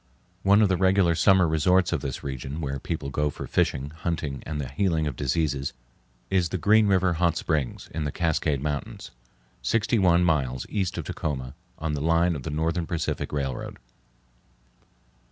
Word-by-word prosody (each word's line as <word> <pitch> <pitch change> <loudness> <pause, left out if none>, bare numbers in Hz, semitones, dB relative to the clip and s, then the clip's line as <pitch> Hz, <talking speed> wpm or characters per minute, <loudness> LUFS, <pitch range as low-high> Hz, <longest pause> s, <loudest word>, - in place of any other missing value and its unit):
One 100 +3 +5
of - - +5
the 95 - +2
regular 95 -1 +3
summer 95 +1 +4
resorts 90 +4 +3
of 80 - -1
this 70 -3 -5
region 65 +2 -5
where 70 -3 -3
people 75 -2 -4
go 75 +2 0
for - - -7
fishing, 70 +2 0
hunting, 80 -4 -3
and 75 -2 -3
the 70 - -3
healing 80 +3 0
of 75 -4 -2
diseases, 70 0 -1 0.6
is 90 -3 +2
the 95 - -2
Green 105 +5 +4
River 95 -2 +3
Hot 85 0 +1
Springs, 75 -6 -2
in 80 0 -2
the 75 - -2
Cascade 75 -4 0
Mountains, 75 -1 -4 0.5
sixty 115 +1 +1
one 90 -2 +4
miles 70 -7 0
east 95 -4 -1
of - - -4
Tacoma, 65 -3 -4 0.2
on 80 -1 -2
the 70 - -2
line 85 +2 +2
of 70 - -5
the 80 - -5
Northern 80 +2 -1
Pacific 85 -2 -2
Railroad. 70 -4 -3
80 Hz, 170 wpm, -26 LUFS, 70-90 Hz, 0.6 s, One